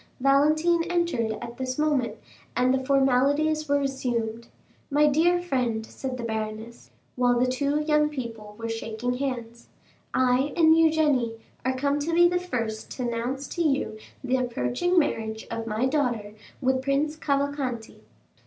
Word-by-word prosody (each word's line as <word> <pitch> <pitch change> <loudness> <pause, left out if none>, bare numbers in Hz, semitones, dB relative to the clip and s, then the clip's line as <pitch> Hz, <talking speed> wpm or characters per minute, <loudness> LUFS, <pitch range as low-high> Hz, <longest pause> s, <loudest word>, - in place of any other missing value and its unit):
Valentine 305 +5 +3
entered 340 -11 0
at 235 0 -8
this 255 0 -3
moment, 295 -5 +1 0.4
and 255 +1 +3
the 265 0 0
formalities 280 +3 +2
were 285 - +4
resumed. 240 -5 -2 0.4
"My 295 +1 +4
dear 330 +5 +3
friend," 250 -10 -1
said 260 +2 -6
the 240 - -5
baroness, 220 +1 -5 0.3
while 245 -1 +3
the 250 - +3
two 280 +4 0
young 300 0 +2
people 225 -7 -7
were 230 0 -4
shaking 225 +2 -3
hands, 235 -4 -4 0.4
"I 255 +2 +2
and 320 -1 +6
Eugénie 300 -8 +3 0.3
are 260 +1 0
come 280 +2 +1
to 330 +3 -1
be 345 0 +7
the 355 0 +1
first 230 -11 -4
to 255 - -4
announce 245 +4 -3
to 345 - -3
you 275 -8 0 0.2
the 260 0 +1
approaching 250 - 0
marriage 220 -8 0
of 230 0 -4
my 220 +3 0
daughter 245 -7 -1 0.3
with 260 0 +1
Prince 280 +3 0
Cavalcanti." 280 -6 -2
260 Hz, 150 wpm, -26 LUFS, 235-300 Hz, 0.4 s, be